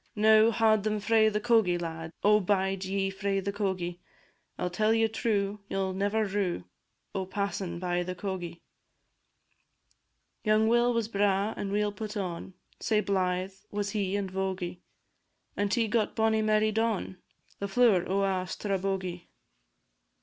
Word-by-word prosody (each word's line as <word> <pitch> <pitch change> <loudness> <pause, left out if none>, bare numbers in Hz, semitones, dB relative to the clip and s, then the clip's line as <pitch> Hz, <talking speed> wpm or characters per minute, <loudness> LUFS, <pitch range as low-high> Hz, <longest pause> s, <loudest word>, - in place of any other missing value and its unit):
Now, 220 +1 +6
haud 220 -2 +3
ye 215 0 0
frae 220 +1 +3
the 210 0 -1
cogie, 220 -6 +3
lads; 165 -1 -5
O 210 +1 +6
bide 195 -1 0
ye 195 0 -1
frae 195 0 -1
the 200 +1 -3
cogie! 185 -4 -2 0.6
I - - -4
'll 180 - 0
tell 215 +4 +2
ye 225 0 +3
true, 210 -2 -1
ye - - -2
'll 190 -1 -1
never 205 +3 0
rue, 195 -3 -1 0.5
O' 190 -1 -3
passin' 195 -3 -3
by 175 0 -1
the 180 +1 -4
cogie. 180 -3 -5 1.8
Young 215 0 +3
Will 240 +1 +4
was 230 -2 0
braw 200 0 +1
and 195 - -4
weel 210 0 +1
put 215 0 -6
on, 185 -1 -5 0.2
Sae 215 -2 +1
blythe 185 -1 0 0.2
was 205 -1 -2
he 200 -2 -1
and 195 -2 -2
vogie; 185 -2 -3 0.8
And 205 -1 0
he 230 -1 +2
got 215 0 0
bonnie 220 -1 +2
Mary 215 0 +2
Don, 220 -4 -1 0.4
The 200 - -2
flower 205 -4 +4
o' 195 +1 +1
a' 185 -1 0
Strabogie. 190 -3 -3
200 Hz, 155 wpm, -29 LUFS, 185-215 Hz, 1.8 s, Now